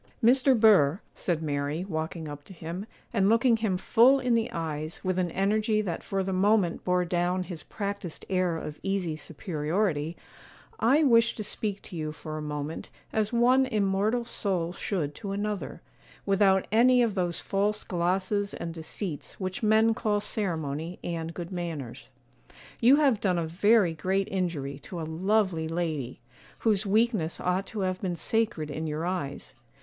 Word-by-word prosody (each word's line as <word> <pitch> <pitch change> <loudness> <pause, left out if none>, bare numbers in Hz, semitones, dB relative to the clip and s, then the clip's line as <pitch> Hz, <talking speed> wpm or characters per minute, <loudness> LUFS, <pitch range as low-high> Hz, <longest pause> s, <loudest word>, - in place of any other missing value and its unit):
'Mr. 255 +1 +5
Burr,' 190 -7 +5
said 165 -3 -2
Mary, 145 +3 -2
walking 160 -2 -4
up 145 -1 -8
to - - -12
him, 170 +4 -6 0.3
and 200 -3 +3
looking 230 +1 +4
him 215 -5 0
full 245 +8 +5
in 250 -2 +1
the 230 0 +1
eyes 155 -1 -4
with 185 0 0
an 180 -1 0
energy 215 +4 +1
that 185 -6 -2
for 195 -1 -1
the 190 0 -2
moment 195 -2 +2
bore 180 0 +1
down 180 +1 0
his 175 -3 -7
practised 200 -4 -5
air 185 -3 +1
of 150 -1 -7
easy 195 -5 -1
superiority, 160 +1 -2 0.6
'I 270 +8 +4
wish 230 -4 +4
to 215 - -4
speak 205 -1 -2
to - - -10
you 155 -2 -3
for 155 0 -7
a 155 - -4
moment, 150 +1 -5 0.2
as 215 -1 +1
one 250 +3 +4
immortal 210 +1 +1
soul 185 -7 -1
should 165 -7 -2
to 200 +4 -5
another, 205 0 -4 0.4
without 195 -1 +3
any 245 +3 +5
of 225 -3 +1
those 175 -3 0
false 205 +2 0
glosses 190 +3 -1
and 165 - -5
deceits 165 0 -6
which 185 +1 -3
men 220 +1 +4
call 210 -2 0
ceremony 165 -5 -3
and 165 -1 -4
good 175 0 -6
manners. 165 -11 -5 0.7
You 245 +4 +7
have 275 -8 +3
done 185 -3 +1
a 170 - 0
very 190 +2 +3
great 190 +4 0
injury 160 -7 -2
to 175 +4 -8
a - - -3
lovely 180 0 +1
lady, 160 -8 -3 0.4
whose 210 -2 +1
weakness 210 -5 +1
ought 180 +2 0
to 215 - -4
have 185 -1 -1
been 180 -3 -2
sacred 170 -7 -1
in 160 +2 -3
your 155 +2 -2
eyes. 175 -6 -4
185 Hz, 165 wpm, -28 LUFS, 165-215 Hz, 0.7 s, You